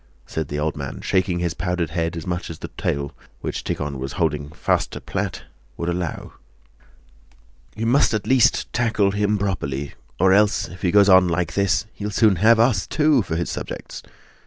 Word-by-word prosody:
said 80 Hz, -2 st, -4 dB
the 75 Hz, -, -4 dB
old 75 Hz, +1 st, -1 dB
man, 70 Hz, -4 st, -6 dB
shaking 95 Hz, -2 st, 0 dB
his 85 Hz, -1 st, -1 dB
powdered 90 Hz, -3 st, -2 dB
head 85 Hz, 0 st, -2 dB
as 80 Hz, -, -6 dB
much 90 Hz, 0 st, -3 dB
as 80 Hz, -, -7 dB
the -, -, -7 dB
tail, 70 Hz, 0 st, -2 dB, 0.3 s
which -, -, -4 dB
Tíkhon 70 Hz, -2 st, -3 dB
was 65 Hz, +1 st, -5 dB
holding 75 Hz, -4 st, -1 dB
fast 80 Hz, -, 0 dB
to -, -, -5 dB
plait, -, -, -4 dB, 0.3 s
would 85 Hz, -, -2 dB
allow. 85 Hz, -2 st, -4 dB, 1.4 s
"You 115 Hz, -, -3 dB
at 110 Hz, -7 st, +2 dB
least 130 Hz, -2 st, +5 dB
must -, -, -6 dB
tackle 110 Hz, -4 st, +2 dB
him 105 Hz, +1 st, +1 dB
properly, 70 Hz, -9 st, -3 dB, 0.3 s
or 95 Hz, +1 st, +5 dB
else 105 Hz, +1 st, +3 dB
if 90 Hz, -, -12 dB
he 90 Hz, -, +1 dB
goes 100 Hz, +2 st, +5 dB
on 95 Hz, -2 st, +7 dB
like 85 Hz, -1 st, -1 dB
this 100 Hz, 0 st, +1 dB
he'll 105 Hz, 0 st, -5 dB
soon 105 Hz, -2 st, +3 dB
have 110 Hz, +5 st, +5 dB
us, 115 Hz, -4 st, +3 dB
too, 150 Hz, -4 st, +3 dB
for 85 Hz, -5 st, -3 dB
his 85 Hz, 0 st, -2 dB
subjects! -, -, -6 dB
90 Hz, 185 wpm, -22 LUFS, 80-105 Hz, 1.4 s, on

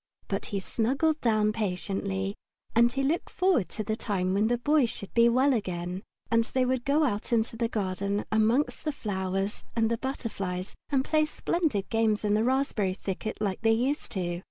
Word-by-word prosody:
But 195 Hz, -, -2 dB
he 200 Hz, -, -2 dB
snuggled 270 Hz, +10 st, 0 dB
down 215 Hz, -2 st, +2 dB
patiently, 195 Hz, -1 st, -2 dB, 0.4 s
and 235 Hz, +1 st, +5 dB
looked 275 Hz, +5 st, 0 dB
forward 360 Hz, -, +2 dB
to 215 Hz, -, -4 dB
the 215 Hz, +1 st, -1 dB
time 190 Hz, -5 st, -1 dB
when 205 Hz, +3 st, +3 dB
the 240 Hz, +1 st, +2 dB
Boy 290 Hz, +1 st, +3 dB
should 200 Hz, -3 st, -8 dB
be 235 Hz, 0 st, +6 dB
well 260 Hz, +4 st, +4 dB
again, 180 Hz, -4 st, -3 dB, 0.3 s
and 230 Hz, 0 st, +4 dB
they 255 Hz, +2 st, 0 dB
would 255 Hz, -1 st, 0 dB
go 290 Hz, +3 st, +3 dB
out 215 Hz, -4 st, -1 dB
in 230 Hz, -2 st, +4 dB
the 230 Hz, +1 st, -2 dB
garden 200 Hz, -1 st, -1 dB
amongst 220 Hz, +6 st, +2 dB
the 305 Hz, -, 0 dB
flowers 195 Hz, -3 st, -2 dB
and 225 Hz, -1 st, +2 dB
the 230 Hz, -, 0 dB
butterflies 195 Hz, -9 st, -4 dB, 0.2 s
and 270 Hz, -2 st, +1 dB
play 310 Hz, -1 st, +2 dB
splendid 305 Hz, -, -1 dB
games 220 Hz, -2 st, +2 dB
in 205 Hz, -, +2 dB
the 215 Hz, +1 st, +3 dB
raspberry 240 Hz, -7 st, +1 dB
thicket 200 Hz, +2 st, -4 dB
like 200 Hz, -3 st, -2 dB
they 225 Hz, 0 st, +4 dB
used 260 Hz, +6 st, -1 dB
to. 175 Hz, -2 st, -2 dB
220 Hz, 180 wpm, -28 LUFS, 195-255 Hz, 0.4 s, be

